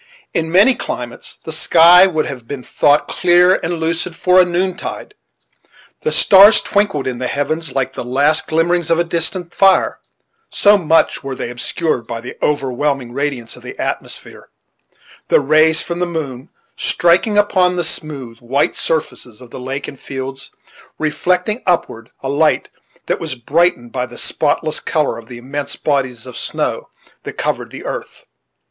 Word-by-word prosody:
In 160 0 -1
many 200 +9 +6
climates 120 - -6
the 160 - -6
sky 170 +3 +6
would 160 -4 -1
have 125 -4 -7
been 135 -1 -6
thought 145 +4 +2
clear 180 0 +4
and 170 +1 -2
lucid 165 +1 -2
for 180 +2 +4
a - - +3
noontide. 180 +1 -3 0.9
The 465 - -1
stars 200 - +7
twinkled 200 -9 0
in 125 -2 -3
the 130 - -2
heavens, 150 +2 -2
like 135 -1 -1
the - - -5
last 140 +5 +1
glimmerings 170 +1 +1
of 170 +1 +2
distant 170 +1 -2
fire, 195 -1 +3 0.5
so 205 0 +4
much 165 -6 +2
were 135 -1 -5
they 120 - -5
obscured 125 0 -2
by 115 - -5
the 125 +2 -9
overwhelming 135 -2 -1
radiance 135 -4 -3
of - - -14
the - - -9
atmosphere; - - -5 0.8
the - - +4
rays 155 +2 +3
from 170 0 -5
the 180 - 0
moon 145 -5 -5 0.3
striking 175 +5 +2
upon 185 -3 +3
the 175 - -1
smooth, 140 -7 -5
white 130 +4 0
surfaces 130 -8 -3
of 125 -2 -14
the - - -8
lake 135 +2 -5
and 140 - -10
fields, 135 0 -7 0.5
reflecting 180 +8 -1
upward 115 -10 -1
a - - -3
light 145 +3 +1 0.4
that - - -1
was - - -4
brightened 130 -1 0
by 125 -1 -3
the 120 - -12
spotless 155 +1 0
color 150 -8 -1
of 115 - -14
the 120 - -9
immense 140 +4 -5
bodies 130 -6 -2
of 125 -2 -10
snow - - -3 0.3
which - - -8
covered - - -2
the - - -10
earth. - - -7
155 Hz, 160 wpm, -17 LUFS, 130-175 Hz, 0.9 s, stars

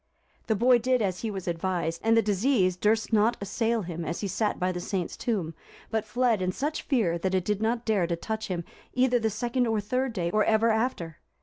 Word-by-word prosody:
The 220 - +2
boy 240 +3 +5
did 255 +2 +2
as 185 -3 -1
he 225 - -3
was 190 -3 -6
advised, 170 -1 -2
and 225 0 +4
the 225 - +4
disease 205 -2 +2
durst 220 +4 +1
not 220 +2 +3
assail 225 +3 -1
him 170 -1 -5
as 165 +2 -4
he 205 - -1
sat 210 +3 -1
by 180 +1 +1
the 180 - -4
saint's 180 -1 -3
tomb; 190 -9 -2 0.4
but 220 -1 0
fled 240 -3 +1
in 185 0 0
such 295 +10 -2
fear 200 - +1
that 190 +2 0
it 185 -2 0
did 210 0 -1
not 230 +2 0
dare 205 -6 +2
to 170 - -1
touch 220 +5 -4
him, 175 -2 -3 0.3
either 250 -1 +3
the 225 -1 +1
second 240 +4 -1
or 225 -1 +1
third 255 +5 -1
day, 170 -5 -1
or 215 +2 +3
ever 220 +1 +3
after. 220 - -2
215 Hz, 225 wpm, -27 LUFS, 185-230 Hz, 0.4 s, boy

